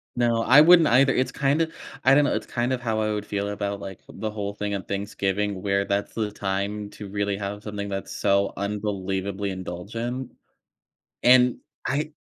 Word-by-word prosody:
No. 120 -1 +2
I 140 +5 +8
wouldn't 170 -1 +7
either. 135 +2 +5
It's 130 0 0
kinda 150 +4 +1 0.3
I 130 - +6
don't 145 +1 +6
know, - - +1
it's - - -3
kind 120 +1 -1
of 130 -1 -1
how 110 -2 -1
I 110 0 0
would 105 -1 -3
feel 100 0 -2
about, 100 -1 -3
like, 95 -1 -8
the 110 - -5
whole 100 -1 -4
thing 105 0 -3
on 95 - -4
Thanksgiving, 100 0 -2
where 100 0 +1
that's 100 +1 -1
the 110 -2 -2
time 100 +1 -3
to 105 - -9
really 100 0 -1
have 105 +1 -5
something 100 -1 -5
that's 95 -1 -5
so 100 0 +2
unbelievably 100 -1 -2
indulgent. 115 +8 -5 0.9
And 125 0 +6 0.3
I 150 +2 -1
105 Hz, 180 wpm, -25 LUFS, 100-120 Hz, 0.9 s, I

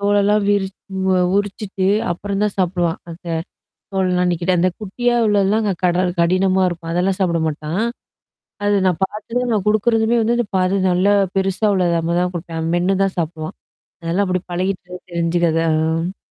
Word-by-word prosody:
தோலெல்லாம் 205 +1 +3
விரிச்சி 195 -1 +1 0.4
அ, - - +2 0.2
உரிச்சுட்டு 200 -1 -2 0.2
அப்புறம் 200 +3 -3
தான் 210 -1 0
சாப்பிடுவான். 175 -2 0
அந்த 170 +2 -11 0.7
தோலெல்லாம் 180 -2 +1
நீக்கிட்டு 175 +2 0
அந்த 185 +2 +3
குட்டியா 240 +4 -1
உள்ளதுலாம் 205 +1 +2
அங்க 200 -2 +1
கடல் 180 0 +2
கடினமா 185 +2 +3
இருக்கும். 165 -1 -4
அதெல்லாம் 185 +2 +1
சாப்பிட 170 -3 +1
மாட்டான். 155 +5 -3 0.8
அது 205 - +3
நான் 180 -3 +1
பார்த்ததும் 235 +5 -2
நான் 205 -2 0
கொடுக்குறதுமே 225 +2 +2
வந்து 235 +2 +2
அந்த 240 - 0
பாதி 185 +2 +2
நல்லா 190 +3 +3 0.2
பெருசா 195 +3 +1
உள்ளது 175 -2 +2 0.3
தான் 180 0 0
கொடுப்பேன். 165 -1 -5
அவன் 165 +1 -1
மென்னு 180 +2 +1
தான் 195 -1 -1
சாப்பிடுவான். 160 -1 -3 0.5
அதெல்லாம் 175 +5 +1
அப்படி 185 -1 0
பழகிட்டு 180 0 -3
தெரிஞ்சிக்கிறதான், 165 -1 +1
ஆ. 165 +4 -2
185 Hz, 155 wpm, -19 LUFS, 175-205 Hz, 0.8 s, தோலெல்லாம்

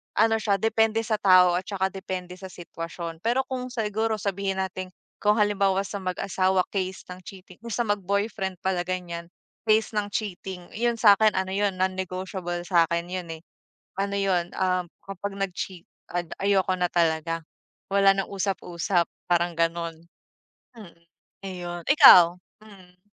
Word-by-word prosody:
ano 225 0 +3
siya, 205 -2 +1
depende 225 +2 +1
sa 215 -1 -1
tao 185 -3 +6
at 190 - -12
tsaka 190 -2 -1
depende 185 -2 -6
sa 190 - -8
sitwasyon. 170 -2 -7
Pero 240 +7 +1
kung 255 -1 -3
siguro 220 -2 -1
sabihin 200 -1 -2
natin 185 0 -5 0.3
kung 210 0 +3
halimbawa 195 -2 +2
sa 200 - -5
mag-asawa, 185 0 +1
case 190 -1 -3
ng 180 - -8
cheating, 185 -1 -12
kung 235 - -7
sa 240 - 0
mag-boyfriend 200 -1 -1
pala 185 -2 0
ganyan, 175 -2 -4 0.4
case 220 +1 +3
ng 210 -1 0
cheating, 190 -3 -5
'yun 235 +2 +1
sa 210 -3 +6
akin 215 -2 +4
ano 190 0 -1
'yun, 200 0 0
non-negotiable 185 -1 -3
sa 170 -2 +3
akin 170 +1 -2
'yun 180 -2 -4
eh. 160 - -14 0.6
Ano 200 +1 -1
'yun, 180 -3 0
ah, 185 -1 +1 0.2
kapag 195 +1 -5
nag-cheat, 185 -2 -4 0.3
ad 175 -2 -2
ayoko 195 -1 +2
na 180 - +1
talaga, 165 -1 0 0.5
wala 195 0 +5
nang 195 0 -3
usap-usap, 180 -3 -1 0.2
parang 175 -1 +1
ganoon. 165 0 -2 0.7
Mm, 195 -7 -13 0.5
ayon. 175 -2 -6
Ikaw, 180 - +8 0.3
mm? 185 -4 -17
190 Hz, 150 wpm, -25 LUFS, 175-205 Hz, 0.7 s, Ikaw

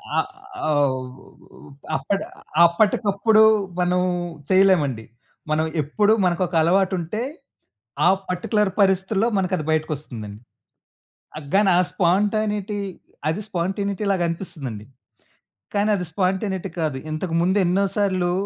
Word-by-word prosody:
ఆ! - - +1 0.5
అవ్ 140 -4 +1 0.9
అప్పడ్ 200 0 -1 0.4
అప్పటికప్పుడు 205 +4 +3 0.4
మనం 180 0 +2 0.5
చేయలేమండి. 175 -12 +3 0.5
మనం 155 +1 +2 0.2
ఎప్పుడు 205 +9 +2
మనకొక 175 0 0
అలవాటుంటే, 185 +3 +1 0.8
ఆ - - +6 0.2
పార్టిక్యులర్ 190 +3 0
పరిస్థితుల్లో 195 +3 +2
మనకది 185 -5 -1
బయటికొస్తుందండి. 135 -9 -4 1.0
ఆ! - - -4 0.2
గాని 200 -1 +4
ఆ - - +5
స్పాంటనిటీ 205 +2 0 0.5
అది 185 +7 -2
స్పాంటేనిటీ‌ 200 +3 -2
లాగనిపిస్తుందండి. 165 - -3 0.9
కానీ, 205 +1 +2
అది 180 - -3
స్పాంటేనిటీ 190 +1 -1
కాదు. 150 -4 -1
ఇంతకు 165 +2 -3
ముందు 190 +3 +2
ఎన్నో 190 +3 +2
సార్లు 185 -3 +1
185 Hz, 100 wpm, -22 LUFS, 160-200 Hz, 1.0 s, ఆ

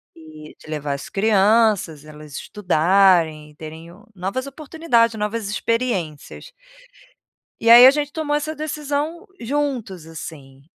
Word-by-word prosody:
Eh, 155 -1 -13
de - - -17
levar 150 -2 -3
as 140 - -7
crianças, 205 -6 +2
elas 150 -1 -13
estudarem 175 -4 +2
e - - -23
terem 160 +2 -10 0.3
novas 195 +9 -4
oportunidades, 275 -6 0
novas 210 0 -3
experiências. 210 - -3 1.1
E 230 - 0
aí 240 +2 +10
a - - +8
gente 290 0 -3
tomou 295 -2 -1
essa 310 +1 -3
decisão 305 +2 -4
juntos 235 - -3
assim, 140 -4 -10
205 Hz, 125 wpm, -21 LUFS, -, 1.1 s, aí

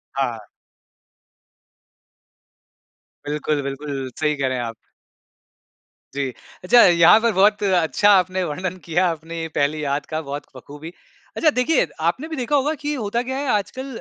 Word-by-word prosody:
हाँ। 120 -6 -3 2.8
बिल्कुल, 150 0 -1
बिल्कुल, 135 -1 -5
सही 150 -1 +1
कह 140 -2 -1
रहे 130 -1 -2
हैं 120 - -2
आप। 115 -1 -5 1.4
जी। 140 -2 -1 0.3
अच्छा 235 +6 +6
यहाँ 175 +4 +6
पर 230 0 +1
बहुत 205 +2 +3
अच्छा 190 +1 +2
आपने 185 0 +2
वर्णन 185 +3 -4
किया 175 +3 +1
आपने 165 0 -5
पहली 150 +1 0
याद 140 0 -2
का 155 0 -4
बहुत 145 0 -6
बख़ूबी। 145 +5 -10 0.5
अच्छा 315 - +4
देखिए 285 +2 +1 0.2
आपने 275 - -5
भी 320 - -5
देखा 265 +3 -1
होगा 290 +3 +1
कि 295 0 -2
होता 235 -2 -2
क्या 265 - -2
है 285 0 -3
आजकल 235 +6 -2
170 Hz, 145 wpm, -21 LUFS, 145-215 Hz, 2.8 s, अच्छा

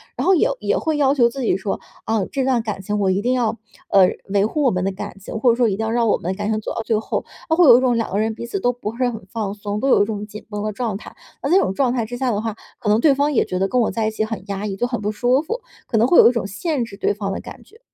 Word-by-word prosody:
然 - - -2
后 380 - +5
也 430 +7 +3
也 - - +1
会 315 -1 -1
要 280 -2 +3
求 245 -4 +4
自 270 +3 -6
己 230 - +1
说： 195 +1 -3 0.3
“啊， 220 -2 +1
这 270 - -1
段 255 -3 +2
感 195 - -4
情 205 +2 -2
我 195 -2 +2
一 190 +2 +1
定 245 +4 +1
要， 230 -3 0 0.3
呃 190 -2 +6 0.2
维 200 0 +3
护 300 +8 -1
我 265 - +5
们 185 0 -1
的 195 - 0
感 195 0 -7
情， 195 +3 -6
或 245 - +4
者 - - +1
说 240 -1 +3
一 200 - 0
定 220 - -3
要 - - -1
让 235 0 +2
我 210 - +3
们 175 - -3
的 190 - -5
感 210 0 -2
情 215 - 0
走 - - -5
到 - - -3
最 220 -1 +1
后。” - - -3 0.2
它 320 - +3
会 350 +1 +5
有 245 -4 +9
一 - - +1
种 250 -2 +2
两 230 - -2
个 200 - 0
人 220 +1 0
彼 235 - -6
此 220 -4 -3
都 245 +6 +2
不 230 -2 -6
是 250 0 +1
很 225 -5 -7
放 215 -4 -3
松， 205 0 -4
都 270 - -1
有 225 - +5
一 - - 0
种 210 -1 -4
紧 210 0 -10
绷 210 -1 -4
的 215 - -1
状 215 -2 -3
态。 - - -12 0.3
那 275 - -2
在 345 - +4
这 390 - +6
种 190 - -1
状 255 +4 +1
态 240 -3 -1
之 245 +2 -6
下 255 -1 0
的 210 -1 -1
话， 225 -2 -3 0.2
可 210 - -3
能 210 +1 +4
对 285 +3 +5
方 290 +2 +1
也 - - +3
觉 185 - -3
得 195 - +2
跟 250 +4 +1
我 225 - +1
在 225 -1 -1
一 - - -1
起 215 - -1
很 220 -4 -5
压 200 +1 -3
抑， 195 - -3
就 220 - -1
很 245 -3 -3
不 210 0 -1
舒 245 +5 +2
服， 455 +10 -4 0.3
可 230 - 0
能 225 +2 +4
会 345 - +6
有 - - +9
一 - - +2
种 235 -5 -2
限 250 - -2
制 205 - -11
对 - - +1
方 200 -1 -4
的 - - -3
感 - - -11
觉。 445 - -21
225 Hz, 370 characters per minute, -21 LUFS, 205-250 Hz, 0.3 s, 有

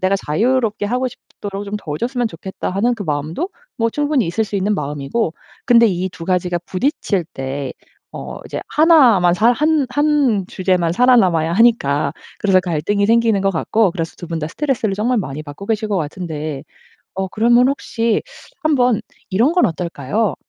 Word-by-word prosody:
내가 185 +1 +2
자유롭게 220 - +1
하고 250 +4 0
싶도록 200 -4 -8
좀 205 +1 -6
도와줬으면 235 - -2
좋겠다.' 190 +1 -6
하는 215 +6 +1
그 220 - -6
마음도 155 - -2 0.3
뭐 230 -2 +1
충분히 290 - 0
있을 220 +7 0
수 210 - -9
있는 200 +2 +1
마음이고 150 +7 -2 0.3
근데 235 -1 +6
이 185 -1 -1
2 165 -2 -9
가지가 180 -1 0
부딪칠 200 - -1
때 135 0 -4 0.4
어 - - -7
이제 - - -5
1 300 - +5
만 175 -1 +3
살 225 +6 +4
한 300 +2 +2
한 280 -8 +2
주제만 180 -3 0
살아남아야 185 -8 +3
하니까 160 -10 +2 0.2
그래서 195 -2 +3
갈등이 180 +4 0
생기는 225 -2 +3
것 195 - +2
같고 195 +4 +1
그래서 165 -2 -4
2 175 - -8
분 165 -1 -3
다 150 - -3
스트레스를 240 - -1
정말 230 +4 0
많이 150 -5 -4
받고 145 +6 -10
계실 220 0 -1
것 205 - 0
같은데 155 -3 -4 0.5
어 190 +1 -2
그러면 240 +5 +4
혹시 230 -5 0 0.4
한번 250 -7 +2 0.3
이런 230 - +3
건 355 0 +3
어떨까요? 170 - -1
200 Hz, 340 characters per minute, -18 LUFS, 170-240 Hz, 0.5 s, 근데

